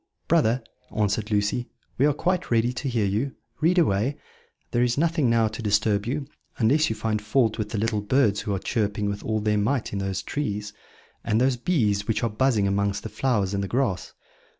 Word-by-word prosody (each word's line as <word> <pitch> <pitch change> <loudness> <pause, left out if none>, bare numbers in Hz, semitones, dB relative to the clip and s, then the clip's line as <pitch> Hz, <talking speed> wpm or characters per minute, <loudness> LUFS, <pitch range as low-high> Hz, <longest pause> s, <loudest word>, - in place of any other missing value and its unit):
"Brother," 115 +2 +3 0.3
answered 105 +1 0
Lucy, 105 +3 0 0.3
"we 140 - +5
are 150 - +3
quite 180 +4 -1
ready 120 +1 +2
to 135 +2 -3
hear 115 -4 +1
you 110 +8 -1 0.2
read 170 +4 +3
away; 135 - +2 0.5
there 120 - +1
is 120 0 +1
nothing 160 -4 +2
now 115 -1 +3
to 110 +2 -7
disturb 105 0 +1
you, 140 +3 -2 0.3
unless 140 +7 +3
you 110 - -2
find 110 -1 -1
fault 110 +1 +1
with 105 -1 -2
the 110 - -3
little 110 0 0
birds 105 -2 +2
who 105 -2 -2
are - - -1
chirping 105 0 -1
with 100 0 -3
all 110 -1 0
their 105 0 +1
might 115 +3 0
in 100 - -1
these 95 -1 -2
trees, 105 -7 -3 0.5
and 110 - +1
those 130 +1 +3
bees 110 - 0
which 110 -1 0
are 115 - +1
buzzing 110 -2 +2
amongst 100 0 0
the 110 - -5
flowers 105 -8 0
in 100 - 0
the 100 - -2
grass." 115 -6 -1
110 Hz, 200 wpm, -25 LUFS, 105-130 Hz, 0.5 s, we